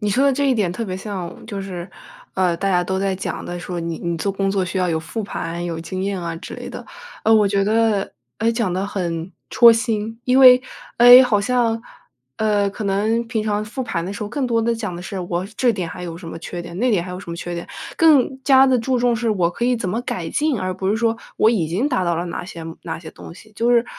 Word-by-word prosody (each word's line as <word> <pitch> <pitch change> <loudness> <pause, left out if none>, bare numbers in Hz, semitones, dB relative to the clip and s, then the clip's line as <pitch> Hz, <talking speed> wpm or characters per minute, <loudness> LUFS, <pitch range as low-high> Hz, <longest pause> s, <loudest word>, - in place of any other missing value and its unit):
你 210 -1 0
说 260 +8 +2
的 280 - +4
这 280 +1 +1
一 - - +3
点 205 -6 +1
特 230 +5 -4
别 185 -2 -4
像， 190 -4 -6
就 200 -3 -5
是， 180 -2 -6 0.5
呃， 180 -2 +1
大 195 - -1
家 180 -1 +3
都 190 +2 -2
在 195 0 0
讲 185 - -5
的 175 0 -5
说， 175 0 -5
你 165 -1 -4
你 170 -1 -2
做 200 +5 -1
工 195 0 -1
作 195 -1 0
需 180 +1 -5
要 180 - +1
有 160 -2 0
复 180 +8 -5
盘、 175 -3 -4
有 170 -2 -3
经 185 +3 -5
验 195 -1 -2
啊 170 -1 -4
之 - - -8
类 - - -7
的。 - - -8 0.4
呃， 225 - +4
我 210 -2 +5
觉 200 0 +1
得， 220 -1 +1 0.3
诶， 225 +1 +2
讲 230 -6 -1
得 190 +2 -1
很 175 -3 -3 0.2
戳 235 -1 +8
心。 225 -1 -2
因 255 +1 +3
为， 255 -1 +9 0.4
诶， 245 +2 +10
好 225 -5 +2
像， 230 0 +1 0.6
呃， 205 -2 +1
可 205 +1 -6
能 215 +4 0
平 225 -2 -1
常 210 -1 -1
复 225 +5 -5
盘 170 -9 -3
的 190 - -4
时 205 - -6
候， 205 - -4
更 265 +3 -2
多 230 -1 +1
地 230 +1 +1
讲 215 -6 -4
的 170 - -7
是： 190 +1 -6
“我 175 0 -2
这 245 -2 +3
点 185 -5 -4
还 180 - -8
有 165 -1 -6
什 170 -1 -9
么 165 - -7
缺 175 +1 -6
点？ 170 0 -9
那 245 +3 +2
点 185 -5 +2
还 180 - -7
有 180 - -6
什 175 - -9
么 170 - -5
缺 175 0 -5
点？” 170 - -6 0.3
更 280 -5 +4
加 270 -1 +6
地 260 -1 +3
注 250 +2 0
重 240 0 +2
是 235 0 -1
我 180 -5 +1
可 235 - -3
以 250 0 +2
怎 215 -5 -3
么 220 +6 -1
改 170 -7 -4
进？ 295 - 0
而 185 -1 -2
不 190 +1 -3
是 210 - +2
说 230 0 +1 0.2
我 220 - +4
已 195 -9 0
经 190 - 0
达 250 -10 0
到 170 -1 +1
了 170 +2 -2
哪 170 - -5
些 170 -2 -9 0.2
哪 160 -2 -5
些 160 -1 -10
东 165 - -12
西， 215 +3 -16
就 235 +1 +1
是， 240 -1 +4
200 Hz, 290 characters per minute, -21 LUFS, 175-230 Hz, 0.6 s, 诶